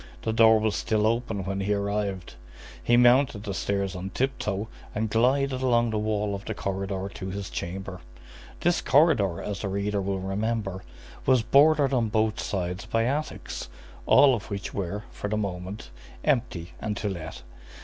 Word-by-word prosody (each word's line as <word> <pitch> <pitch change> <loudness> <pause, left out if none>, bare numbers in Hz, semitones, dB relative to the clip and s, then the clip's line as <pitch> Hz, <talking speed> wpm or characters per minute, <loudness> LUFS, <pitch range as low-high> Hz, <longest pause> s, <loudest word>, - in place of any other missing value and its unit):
The 110 - 0
door 110 0 +6
was 110 -1 0
still 110 -2 +1
open 115 -3 0
when 95 0 -2
he 100 +1 +1
arrived. 100 -2 -2 0.5
He 120 - +4
mounted 125 -3 +4
the 100 -3 -4
stairs 100 -1 -1
on 90 +2 -5
tip 130 +5 -1
toe 100 +1 -2 0.3
and 110 0 -1
glided 130 +3 +2
along 120 -3 +2
the 110 - 0
wall 105 -1 -1
of 100 0 -5
the 110 - -4
corridor 95 -1 -3
to 95 - -6
his 100 0 -5
chamber. 95 +1 -5 0.6
This 175 +1 +2
corridor, 115 - +3
as 100 -2 -4
the 100 - -2
reader 100 +1 -1
will 95 0 -1
remember, 95 0 -2 0.4
was 130 -3 +4
bordered 145 +1 +5
on 115 -4 +2
both 110 0 +1
sides 90 -1 -3
by 115 0 +1
attics, 145 +5 -3 0.4
all 140 -2 +7
of 110 -5 -4
which 100 -1 -5
were, 100 +2 -3
for - - -5
the 105 +1 -1
moment, 95 - -5 0.3
empty 115 - 0
and 105 -1 -2
to 105 - -2
let. 85 -9 -6
105 Hz, 170 wpm, -26 LUFS, 95-115 Hz, 0.6 s, all